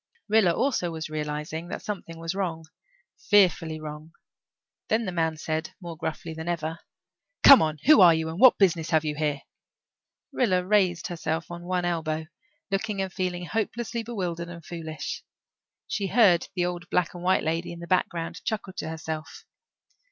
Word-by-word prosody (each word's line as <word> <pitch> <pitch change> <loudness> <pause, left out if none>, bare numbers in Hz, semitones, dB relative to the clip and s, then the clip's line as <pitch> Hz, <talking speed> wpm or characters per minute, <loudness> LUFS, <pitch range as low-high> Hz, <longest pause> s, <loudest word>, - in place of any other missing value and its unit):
Rilla 210 -4 +4
also 220 -3 0
was 160 -1 -6
realizing 150 +2 -4
that - - -6
something 195 -6 -6
was 165 +1 -4
wrong 170 -5 -3 0.6
fearfully 175 -6 +4
wrong. 155 +1 -8 0.7
Then 225 +1 +1
the 185 - -2
man 160 -2 0
said, 160 0 -3
more 170 -3 -7
gruffly 160 +1 -5
than 160 +1 -7
ever, 165 -1 -3 0.6
"Come 275 - +11
now. 155 -1 +1
Who 300 -4 +8
are 175 -2 +9
you 160 0 0
and 165 +3 -6
what 255 0 +8
business 170 -5 +2
have 160 -2 +2
you 150 - -1
here?" 150 -2 -1 0.9
Rilla 185 -8 +1
raised 185 -4 +2
herself 165 -1 -3
on 175 0 -7
one 180 0 -1
elbow, 160 -2 -1 0.5
looking 195 +1 -1
and 190 -2 -2
feeling 180 -2 -2
hopelessly 230 +3 -2
bewildered 180 -7 -4
and 170 -2 -10
foolish. 160 -2 -6 0.6
She 200 -2 -2
heard 195 -5 +4
the 175 -1 +1
old 175 0 -4
black 180 -2 +1
and 175 - -8
white 185 +1 +2
lady 165 +2 -2
in 170 - -8
the 170 - -7
background 170 -2 -1
chuckle 210 -3 -3
to - - -3
herself. 160 -1 -6
170 Hz, 165 wpm, -26 LUFS, 160-190 Hz, 0.9 s, Come